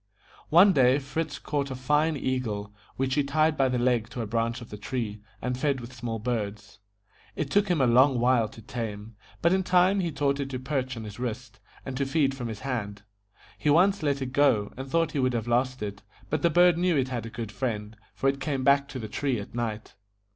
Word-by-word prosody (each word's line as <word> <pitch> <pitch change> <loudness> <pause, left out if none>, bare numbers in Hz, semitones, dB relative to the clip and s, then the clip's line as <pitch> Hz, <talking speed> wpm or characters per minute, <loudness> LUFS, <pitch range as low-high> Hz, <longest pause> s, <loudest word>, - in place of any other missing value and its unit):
One 185 +5 +7
day 130 -2 +5
Fritz 145 +2 -3
caught 140 -2 -2
a 130 - -4
fine 150 +4 +1
EA 130 -1 0
GLE, 105 -4 -5 0.2
which 130 0 -1
he 145 - +2
tied 155 +3 +2
by 135 -2 +2
the 125 - 0
leg 120 -2 +1
to 120 - -4
a - - -3
branch 115 +2 -1
of 120 - -11
the 105 - -6
tree, 105 -1 -4 0.2
and 125 0 -1
fed 140 +1 0
with 120 +1 -9
small 115 -1 -4
birds. 105 -3 -4 0.6
It 145 -2 -3
took 205 0 +3
him 175 -4 +1
a 130 - +4
long 130 +2 +5
while 120 -2 +3
to 115 - -13
tame, 110 -2 -6 0.3
but 170 +2 +4
in 190 - +2
time 185 +2 +3
he 175 -3 -1
taught 140 -1 0
it 140 -1 -3
to 130 - -3
perch 130 -1 -3
on 115 - -6
his 105 0 -9
wrist, 125 -2 -5 0.3
and 135 - -5
to 140 -1 0
feed 135 -1 +2
from 125 -3 -5
his 110 -2 -6
hand. 105 -7 -4 0.6
He 150 - +1
once 190 +6 +4
let 140 -3 0
it 130 -1 -6
go, 125 -8 +3
and 135 +1 -7
thought 165 +1 +1
he 145 - -2
would 130 -1 +2
have 115 -1 -2
lost 125 0 0
it, 100 -1 -5 0.3
but 155 -1 0
the 170 - +4
bird 175 +1 +5
knew 180 -3 +2
it 130 -1 +1
had 120 -3 -4
a - - -7
good 110 -1 -6
friend, 110 -4 -3 0.2
for 135 - 0
it 135 0 +1
came 135 -3 -1
back 140 +1 +4
to 140 - -7
the 110 -3 -5
tree 130 +2 -1
at 100 - -9
night. 110 -2 -4
130 Hz, 235 wpm, -27 LUFS, 115-145 Hz, 0.6 s, One